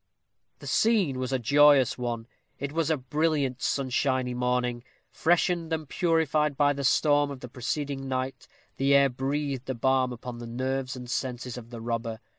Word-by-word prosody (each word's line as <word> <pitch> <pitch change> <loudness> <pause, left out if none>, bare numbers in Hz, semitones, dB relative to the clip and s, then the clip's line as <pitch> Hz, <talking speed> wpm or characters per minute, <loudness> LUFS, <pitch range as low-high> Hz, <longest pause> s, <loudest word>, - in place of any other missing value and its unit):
The - - -13
scene 200 - +2
was 130 0 -3
a 130 - +2
joyous 140 +1 +5
one. 120 -2 -3 0.3
It 140 0 -4
was 165 0 0
a 160 - +2
brilliant 140 -1 -1
sunshiny 130 -1 0
morning. 125 -1 -1 0.3
Freshened 170 0 +1
and 160 -2 -2
purified 155 -3 +1
by 145 -1 +4
the 140 0 -5
storm 145 +1 +3
of 140 -2 -8
the 125 - -7
preceding 135 +3 -3
night, 130 0 -3 0.3
the 140 +1 +3
air 140 0 +5
breathed 135 +1 -3
a 130 - -1
balm 130 +1 +2
upon 120 0 -7
the 120 - -7
nerves 130 +2 -2
and 125 -1 -8
senses 125 -1 -3
of 120 -2 -9
the 120 -2 -8
robber. 115 -1 -3
135 Hz, 170 wpm, -27 LUFS, 125-145 Hz, 0.3 s, joyous